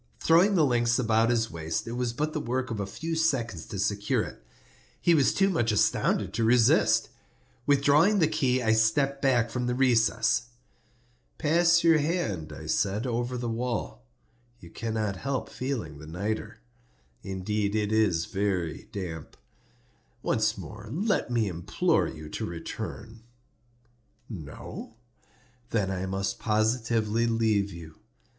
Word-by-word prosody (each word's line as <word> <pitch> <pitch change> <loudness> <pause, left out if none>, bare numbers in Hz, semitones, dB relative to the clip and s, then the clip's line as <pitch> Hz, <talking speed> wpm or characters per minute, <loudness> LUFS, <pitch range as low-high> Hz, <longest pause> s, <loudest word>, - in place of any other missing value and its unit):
Throwing 180 +5 +4
the 160 -4 +4
links 120 -2 +2
about 115 -1 +2
his 115 -2 +1
waist, 80 +2 -3
it - - -4
was 120 0 -1
but 150 +6 -2
the 155 - -1
work 130 -1 -2
of 110 - -3
a 100 - -2
few 165 +10 -4
seconds 120 - 0
to 100 - -6
secure 100 +1 0
it. - - -10 0.6
He 170 - +3
was 145 -5 +4
too 195 - +2
much 140 - +1
astounded 100 -2 +1
to 115 +2 0
resist. 115 0 +4 0.6
Withdrawing 145 +8 +4
the 165 -5 +4
key 130 -5 +1
I 110 -1 +3
stepped 135 +6 +2
back 125 -4 +2
from 125 -1 -2
the 125 - 0
recess. 120 -2 +2 0.9
"Pass 170 +2 +3
your 165 -2 +5
hand," 145 - -2
I - - -9
said, 100 +4 0
"over 120 +1 -2
the 120 0 -3
wall; 115 - -3 0.6
you 85 - -13
cannot 110 -2 -2
help 135 +5 -3
feeling 115 - -4
the 75 - -11
nitre. 100 +9 -4 0.6
Indeed 100 +2 -2
it 105 -1 0
is 105 -7 +2
very 95 -4 -2
damp. 85 -6 -6 0.9
Once - - +1
more 105 +1 -9
let 195 - 0
me 115 -3 +1
implore 85 -2 0
you 75 0 -8
to - - -5
return. 110 +6 -7 1.1
No? 95 - -8 0.7
Then 105 -6 0
I 95 0 -3
must 95 +1 -2
positively 110 0 +1
leave 110 -3 +1
you. 80 -3 -11
115 Hz, 145 wpm, -27 LUFS, 100-130 Hz, 1.1 s, your